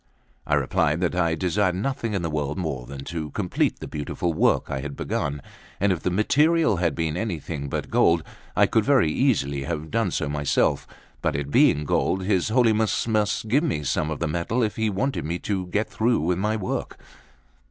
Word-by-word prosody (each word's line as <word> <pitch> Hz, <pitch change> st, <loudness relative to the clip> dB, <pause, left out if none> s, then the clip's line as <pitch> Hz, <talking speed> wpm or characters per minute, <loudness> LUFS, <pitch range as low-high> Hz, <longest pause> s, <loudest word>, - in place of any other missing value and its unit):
I -, -, +3 dB
replied 75 Hz, +3 st, +1 dB
that 90 Hz, -, +1 dB
I 85 Hz, -2 st, +1 dB
desired 90 Hz, +2 st, +1 dB
nothing 115 Hz, +1 st, -2 dB
in 95 Hz, -, -1 dB
the 80 Hz, -, -1 dB
world 75 Hz, -1 st, -2 dB
more 70 Hz, -9 st, -3 dB
than 70 Hz, 0 st, -7 dB
to 80 Hz, 0 st, -5 dB
complete -, -, -1 dB
the -, -, -7 dB
beautiful 75 Hz, +3 st, -3 dB
work -, -, +2 dB
I 70 Hz, -, -2 dB
had 70 Hz, 0 st, -6 dB
begun: 70 Hz, -1 st, -2 dB, 0.4 s
and 100 Hz, +1 st, +3 dB
if 90 Hz, -, 0 dB
the -, -, 0 dB
material 150 Hz, -, +3 dB
had 85 Hz, -2 st, 0 dB
been 80 Hz, -2 st, -1 dB
anything 85 Hz, -7 st, -4 dB
but -, -, -4 dB
gold, 85 Hz, -1 st, +3 dB, 0.3 s
I -, -, +5 dB
could -, -, +2 dB
very 80 Hz, -, +3 dB
easily 75 Hz, -, +1 dB
have 80 Hz, -2 st, -4 dB
done 115 Hz, -4 st, +1 dB
so 75 Hz, -, -2 dB
myself; 75 Hz, -1 st, +1 dB, 0.3 s
but -, -, 0 dB
it 70 Hz, 0 st, -3 dB
being 75 Hz, +1 st, +4 dB
gold, 95 Hz, +5 st, +1 dB
his 95 Hz, -1 st, +1 dB
Holiness 110 Hz, -2 st, +2 dB
must 110 Hz, -1 st, 0 dB
give 135 Hz, +8 st, +3 dB
me 120 Hz, -, -1 dB
some 75 Hz, +2 st, 0 dB
of 80 Hz, -, -3 dB
the 85 Hz, -, -1 dB
metal 85 Hz, +10 st, -1 dB
if 105 Hz, -4 st, -1 dB
he 110 Hz, -1 st, 0 dB
wanted 125 Hz, +8 st, -1 dB
me 85 Hz, +3 st, -2 dB
to 95 Hz, 0 st, -3 dB
get 105 Hz, +5 st, -1 dB
through 115 Hz, -2 st, +1 dB
with 90 Hz, +3 st, 0 dB
my 105 Hz, +2 st, 0 dB
work. 100 Hz, -4 st, -3 dB
90 Hz, 200 wpm, -24 LUFS, 75-110 Hz, 0.4 s, I